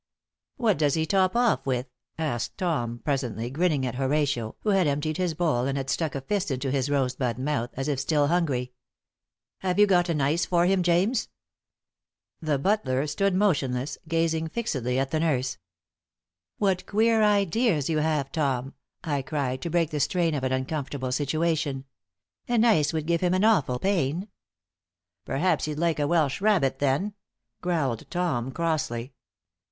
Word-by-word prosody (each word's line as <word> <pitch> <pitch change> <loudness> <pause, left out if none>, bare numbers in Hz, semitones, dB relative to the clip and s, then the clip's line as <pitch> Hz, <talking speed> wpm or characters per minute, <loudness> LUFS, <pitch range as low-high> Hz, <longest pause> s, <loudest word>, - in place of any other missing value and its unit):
"What 220 - +2
does 145 -3 +2
he 160 -1 +1
top 185 +2 +2
off 235 - +2
with?" 125 -1 0 0.3
asked 150 -8 -2
Tom, 120 -10 -2
presently, 125 -5 -2
grinning 150 -2 +1
at 125 - -2
Horatio, 135 -3 0
who 215 - -1
had 190 -4 +3
emptied 145 +2 -1
his 180 -3 -1
bowl 150 -7 +1
and 140 0 -1
had 135 -1 -2
stuck 160 -4 -1
a 135 - -3
fist 200 +6 -1
into 135 0 -2
his 135 0 0
rosebud 130 -4 0
mouth, 130 -3 -1
as 135 +2 -3
if 145 -3 0
still 145 +1 +2
hungry. 140 -7 0 0.9
"Have 185 -1 -1
you 210 - +7
got 180 -3 +3
an 160 -3 0
ice 145 +5 +1
for 175 -1 +2
him, 190 0 +3
James?" 180 +7 +2 1.1
The 155 -3 0
butler 140 -5 +1
stood 195 +5 0
motionless, 140 -9 0
gazing 165 0 0
fixedly 130 - -2
at 135 0 -1
the 155 - +1
nurse. 135 -6 0 1.0
"What 190 -3 0
queer 220 +2 +3
ideas 205 - +2
you 155 -2 +1
have, 150 -3 0
Tom!" 135 -4 -1 0.3
I 145 -5 -1
cried, 130 -2 -2
to 170 - -3
break 165 -1 +1
the 150 - -2
strain 170 +2 +1
of 140 -3 -2
an 130 - 0
uncomfortable 130 0 -2
situation. 145 0 0 0.6
"An 240 -1 +3
ice 155 -11 +4
would 155 -2 -2
give 170 0 +1
him 180 0 +2
an 185 - +1
awful 160 - +3
pain." 180 - 0 1.0
"Perhaps 165 +7 +1
he'd 150 -1 -4
like 165 -1 +1
a 145 - +1
Welsh 155 -2 +1
rabbit, 180 -11 +2
then?" 145 +9 0 0.5
growled 150 -10 -1
Tom, 170 -8 -1
crossly. 140 -7 -2
155 Hz, 165 wpm, -26 LUFS, 135-175 Hz, 1.1 s, you